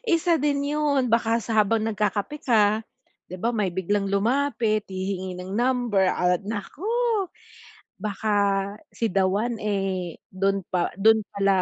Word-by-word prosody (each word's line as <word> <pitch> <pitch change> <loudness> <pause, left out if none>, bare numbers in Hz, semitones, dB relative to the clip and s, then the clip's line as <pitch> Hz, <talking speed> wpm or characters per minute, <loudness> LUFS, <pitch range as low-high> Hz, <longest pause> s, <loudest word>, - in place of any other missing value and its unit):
isa 335 +1 +2
din 285 -1 +1
'yon. 285 -4 +1
Baka 230 0 +3
sa 220 -2 +3
habang 215 +1 +1
nagkakape 210 +5 -1
ka 215 -3 +3 0.5
'di 185 - -7
ba, 235 +6 -1
may 210 -4 0
biglang 195 +2 -1
lumapit, 225 0 +1
hihingi 185 -1 -4
ng 185 +2 -7
number 240 -3 +1
at 180 -1 +1
naku! 225 - -5 1.1
Baka 215 0 -1 0.6
si 230 - -3
the 195 - +3
one, 220 +4 -1
eh, 195 -4 -2 0.2
do'n 195 0 0
pa 180 -2 0
do'n 220 +2 +5
pala 195 -1 +2
210 Hz, 140 wpm, -25 LUFS, 195-235 Hz, 1.1 s, do'n